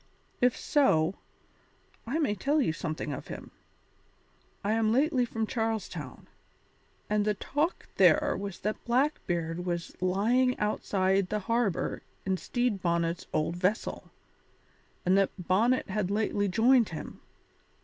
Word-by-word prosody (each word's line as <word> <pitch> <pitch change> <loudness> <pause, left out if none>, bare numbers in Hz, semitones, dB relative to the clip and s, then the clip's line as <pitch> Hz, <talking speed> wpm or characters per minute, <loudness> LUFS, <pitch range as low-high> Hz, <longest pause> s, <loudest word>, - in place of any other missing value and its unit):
"If 250 -1 +3
so, 185 - +2 0.9
I 270 +7 -1
may 290 -10 +1
tell 280 +10 +1
you 240 - +1
something 155 -2 -4
of - - -7
him. - - -8 1.1
I 205 - 0
am 220 -1 +2
lately 265 0 +3
from 225 -1 -2
Charles 225 -3 -1
Town, 150 -7 -9 0.8
and 210 0 +1
the 210 0 +1
talk 295 - -2
there 290 -2 +5
was 200 -2 -6
that 215 +1 -3
Blackbeard 180 - 0
was 175 -1 -3
lying 230 +8 +2
outside 195 -2 +1
the 210 0 -1
harbour 230 -3 0 0.2
in 190 -1 +1
Stede 240 -2 -1
Bonnet's 170 -1 0
old 165 +3 0
vessel, 185 +4 -1 1.0
and 185 +1 +4
that 195 - +3
Bonnet 205 +8 +2
had 205 -2 -1
lately 205 0 0
joined 230 +4 +4
him. 160 - -8
210 Hz, 130 wpm, -29 LUFS, 180-240 Hz, 1.1 s, there